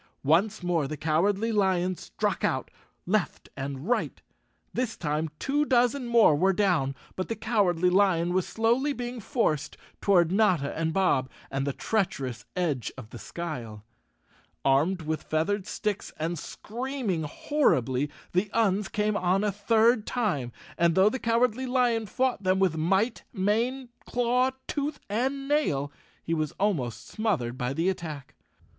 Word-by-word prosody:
Once 185 +8 +2
more 170 -5 +1
the 155 +2 -5
Cowardly 195 +9 +1
Lion 185 -3 +2
struck - - -3
out, - - 0 0.3
left 190 -2 -1
and 140 +3 -5
right. 245 - 0 0.5
This 245 -3 -2
time 155 0 -1
two 290 - +1
dozen 250 -1 +2
more 230 -10 +5
were 190 +6 +3
down, 175 -9 +1 0.2
but 185 - -3
the 230 - -2
Cowardly 190 -6 +2
Lion 180 -3 +3
was 185 -1 +1
slowly 240 +6 +1
being 245 -1 -5
forced 210 - -1 0.2
toward 175 -4 +4
Notta 185 -8 +2
and 160 0 0
Bob, 160 -8 +2 0.2
and 135 +1 -1
the - - +1
treacherous 135 - -2
edge 155 -9 -1
of 110 -4 -10
the 120 - -8
Skyle. 115 -7 -6 0.8
Armed 160 +7 +2
with 155 0 -2
feathered 185 +5 -1
sticks 210 -2 -3
and 165 +1 -2
screaming 240 - -3
hor¬ 225 - -5 0.2
ribly, 130 +4 -2 0.2
the 185 +4 +1
Uns 210 -3 +2
came 210 0 0
on 185 +1 +2
a 210 - +1
third 220 +3 +3
time, 180 - -1 0.3
and 170 -1 +3
though 190 +2 +6
the 260 - -3
Cowardly 240 +2 +1
Lion 245 -3 +1
fought 255 -1 0
them 185 -1 +2
with 190 -4 +2
might, 190 +9 +1
mane, 235 +6 0 0.2
claw, 245 +1 +2 0.2
tooth 285 0 -3
and 270 +5 -1
nail, 150 - +1 0.3
he 165 - -2
was 155 -2 -1
almost 125 - -1
smothered 175 - -1
by 125 0 -2
the 165 +6 0
attack. 155 -7 -4
190 Hz, 150 wpm, -27 LUFS, 155-230 Hz, 0.8 s, though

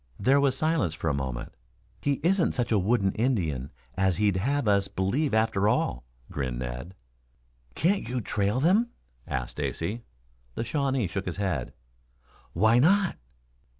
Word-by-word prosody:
There 135 +7 +4
was 140 -2 +2
silence 155 - +1
for 80 -1 -2
a - - +1
moment. 65 -3 -4 0.5
"He 145 - +1
isn't 185 +1 +2
such 120 -1 -1
a 105 - +4
wooden 100 0 +2
Indian 85 - 0 0.3
as 95 -2 +1
he'd 105 -2 +2
have 135 +5 0
us 100 -1 +3
believe 125 +11 0
after 110 -2 +2
all," - - 0 0.3
grinned 65 -4 -3
Ned. 65 +8 -6 0.8
"Can't 175 - +1
you 125 0 -1
trail 105 +1 0
them?" 195 - +3 0.4
asked 65 -2 -3
Stacy. 100 +9 -3 0.5
The - - -2
Shawnee 135 -2 0
shook 95 +2 -4
his 90 - -3
head. 95 -11 -2 0.8
"Why 110 +7 +4
not?" 190 +7 +4
105 Hz, 150 wpm, -27 LUFS, 85-135 Hz, 0.8 s, There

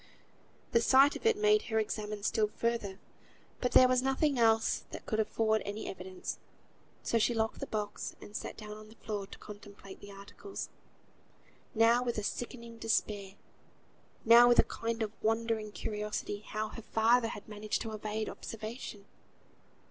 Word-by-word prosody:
The 230 - +4
sight 270 +4 +6
of - - -1
it 450 - +4
made 425 0 +4
her 220 - +1
examine 210 -1 -2
still 215 0 +2
further, 215 -3 -2 0.6
but 250 - -1
there 255 - +8
was 255 0 +3
nothing 270 +1 +1
else 225 -1 +3
that - - -8
could 215 - -1
afford 220 0 +2
any 205 +2 -5
evidence, 185 0 -6 0.6
so 230 - +2
she 235 +2 +2
locked 225 0 0
the - - -4
box, 210 -1 -4
and 205 - -12
sat - - -5
down 210 -1 -8
on 215 0 -12
the 220 - -15
floor 210 -3 -4
to - - -11
contemplate 205 -2 -11
the 200 - -11
articles; 200 - -8 1.1
now 230 +2 +5
with 240 -2 -2
a 210 - -1
sickening 235 +1 -5
despair, 205 -3 -1 0.9
now 235 +1 +9
with 240 - +5
a - - +8
kind 230 0 -3
of 210 - -3
wondering 225 -1 0
curiosity, 210 -1 -3
how 215 +1 -4
her 230 - -8
father 225 +2 +3
had 205 -2 -7
managed 210 0 -3
to 225 - -5
evade 215 0 -3
observation. 220 -2 -7
220 Hz, 165 wpm, -32 LUFS, 210-235 Hz, 1.1 s, now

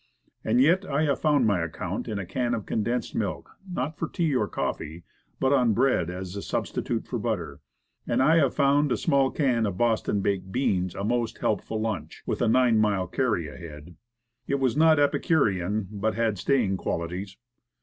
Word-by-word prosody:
And 115 +3 +2
yet, 170 +8 +4
I 150 -3 0
have 140 -3 0
found 145 -5 +3
my 100 -4 +2
account 85 -1 -4
in 105 - -3
a 100 - -4
can 120 +6 -1
of 110 - -5
condensed 115 +2 -2
milk, 100 -4 -3 0.2
not 155 -2 -3
for 165 - -1
tea 160 -6 -1
or - - +1
coffee, 80 +3 -4 0.4
but 130 +1 +2
on 125 -5 +3
bread 125 -9 +2
as 90 +1 -6
a 100 - -4
sub - - -2
stitute - - -3
for - - -4
butter. - - -3 0.5
And - - +1
I 155 +5 +5
have 140 -6 +2
found 140 0 +3
a - - +2
small 135 -1 +2
can 125 -7 +1
of 95 -3 -4
Boston 110 -3 +1
baked 95 -1 -1
beans 95 -8 0
a 100 - -4
most 120 +2 -1
helpful 110 - -1
lunch, 110 -3 -4
with - - -2
a 120 - +3
nine 120 -1 +4
mile 100 -3 +2
carry 110 -4 -1
ahead. 75 +3 -10 0.5
It 140 - 0
was 130 -3 +1
not 160 +1 +5
epicurean, 105 - +1
but 110 +1 -1
had 110 -4 0
staying 115 -8 +1
qualities. 90 +4 -4
115 Hz, 190 wpm, -26 LUFS, 95-135 Hz, 0.5 s, I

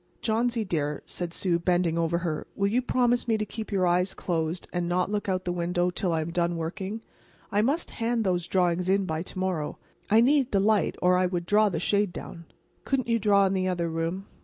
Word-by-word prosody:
"Johnsy, 230 0 0
dear," 150 -5 -2
said 175 -2 -5
Sue, 170 -1 0
bending 175 -1 +1
over 170 0 +1
her, 165 -3 -3
"will 200 - 0
you 240 +5 +2
promise 245 -1 +1
me 225 -1 +2
to 215 - -2
keep 220 +1 -7
your 190 -2 +2
eyes 180 +2 +1
closed, 165 0 -2
and 175 -1 -1
not 180 +2 0
look 205 -1 -2
out 185 -1 -1
the 175 - -1
window 175 +1 0
until 180 0 -1
I 160 -1 +1
am 160 +2 -4
done 170 0 0
working? 190 +6 -4 0.5
I 205 - +3
must 285 +9 0
hand 230 0 -1
those 180 -3 0
drawings 180 -1 +1
in 195 0 +2
by 160 -3 -2
to 185 - -8
morrow. 185 -5 -2 0.3
I 220 - +6
need 270 +2 +3
the 200 - +3
light, 210 +1 +2
or 180 0 +5
I 185 - +3
would 175 -1 -3
draw 210 +3 +4
the 165 -4 -2
shade 200 +2 +1
down." 170 -1 -9 0.4
"Couldn't 260 -3 -1
you 230 0 +2
draw 200 -1 +4
in 190 - +1
the 185 -1 0
other 175 -2 -1
room?" 165 +4 -3
185 Hz, 225 wpm, -27 LUFS, 170-210 Hz, 0.5 s, I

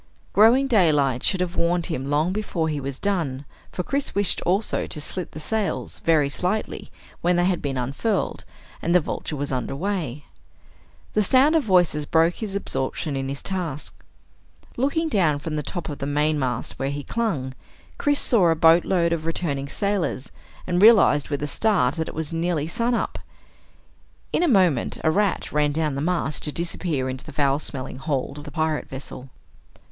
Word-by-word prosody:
Growing 230 +7 +6
daylight 150 - +3
should 190 -2 +1
have 180 0 -2
warned 170 0 +1
him 140 -6 -3
long 155 +5 +1
before 190 -6 -2
he 150 -2 -2
was 135 -1 -5
done, 160 -9 -2 0.3
for 180 - -3
Chris 280 +8 -2
wished 200 -2 +1
also 195 +5 +1
to 155 - -4
slit 180 +4 -4
the - - -8
sails, 215 +6 -2
very 155 -4 +3
slightly, 180 +9 -2 0.3
when 175 +1 +2
they 175 0 +2
had 185 -1 +1
been 135 -2 -2
unfurled 140 - -1 0.4
and 170 - +1
the - - +8
Vulture 155 -1 -4
was 145 0 -3
under 130 +1 -2
way. 155 -5 -3 0.9
The 215 - +3
sound 265 - +4
of 320 - +4
voices 175 - +2
broke 165 +1 +3
his 210 -3 -5
absorption 145 -5 -2
in 135 0 -2
his 140 0 -5
task. 170 -7 -4 0.7
Looking 285 +6 0
down 175 - +2
from 155 +2 -5
the 150 - -1
top 175 +4 -5
of 145 - -6
the 140 - -3
mainmast 145 -4 -1
where 135 - -1
he 145 0 -4
clung, 155 - -2 0.5
Chris 290 -1 +2
saw 200 -9 +3
a 165 - +3
boatload 170 +1 +4
of 160 -1 -3
returning 140 -5 -2
sailors 200 -9 -2 0.3
and 180 0 0
realized 205 -10 +6
with 145 -1 -2
a - - -1
start 145 - +2
that 160 - -2
it - - -9
was 160 +1 -3
nearly 165 -2 0
sunup. 235 +8 -1 1.1
In - - +2
a 355 - +3
moment 185 - +3
a 160 - +3
rat 200 +2 0
ran 150 -1 +2
down 155 -1 -1
the 140 - -3
mast 160 -3 0
to 150 - -2
disappear 165 -4 -2
into 130 0 -5
the 155 - -10
foul 140 -1 +1
smelling 130 -3 -5
hold 140 0 -2
of 145 - -10
the 145 - -8
pirate 155 -1 -1
vessel. 130 -1 -9
160 Hz, 180 wpm, -24 LUFS, 145-190 Hz, 1.1 s, the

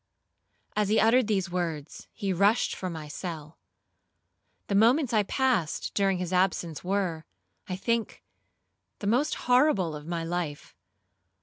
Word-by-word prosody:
'As 210 -1 +1
he 215 - +3
uttered 230 +1 +4
these 190 -4 0
words 165 -5 -4
he 200 -4 -2
rushed 200 +6 +3
from 185 -1 -4
my 155 -2 -7
cell. 155 -1 -7 1.1
The - - -3
moments 240 +6 +4
I 215 - +4
passed 225 - 0
during 195 -2 +2
his 180 0 -3
absence 180 -4 0
were, 180 -4 -1 0.5
I 185 - -2
think, 230 +3 -2 0.7
the - - -7
most 250 +9 +2
horrible 245 - +3
of 150 +1 -9
my 170 -1 -2
life. 165 -3 -4
190 Hz, 135 wpm, -28 LUFS, 170-220 Hz, 1.1 s, uttered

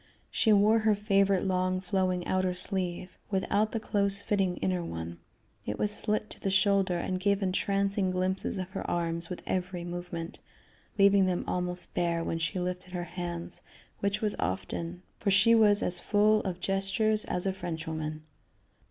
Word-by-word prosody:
She 220 - +2
wore 210 +2 +5
her 215 -1 +3
favorite 200 -2 +2
long 185 0 +1
flowing 185 -2 -1
outer 185 -1 0
sleeve, 180 -1 -2
without 205 +2 +1
the 225 - -2
close 200 -2 +1
fitting 195 -3 0
inner 180 -2 -1
one. 85 - -6 0.4
It 105 - -4
was 210 - +1
slit 215 0 +1
to - - -5
the 195 - -1
shoulder, 195 -1 +2
and 185 +2 -2
gave 200 +1 +1
entrancing 195 +1 0
glimpses 185 +2 0
of 185 0 -5
her - - -4
arms 170 -1 -2
with 180 - -6
every 180 -1 -2
movement, 175 -1 -6 0.6
leaving 200 -1 +5
them 180 -1 0
almost 180 -1 -2
bare 170 -1 0
when 165 - -2
she 160 +3 -2
lifted 180 0 -4
her 175 -1 -2
hands, 175 -1 -5 0.4
which 200 +1 -1
was 210 -2 0
often, 165 - -3 0.2
for 210 - 0
she 200 +4 +5
was 210 -3 +6
as 180 0 +1
full 210 +2 +3
of 180 -2 -4
gestures 195 +3 +1
as 180 - -2
a 190 - +1
Frenchwoman. 160 -3 -5
185 Hz, 165 wpm, -29 LUFS, 175-200 Hz, 0.6 s, was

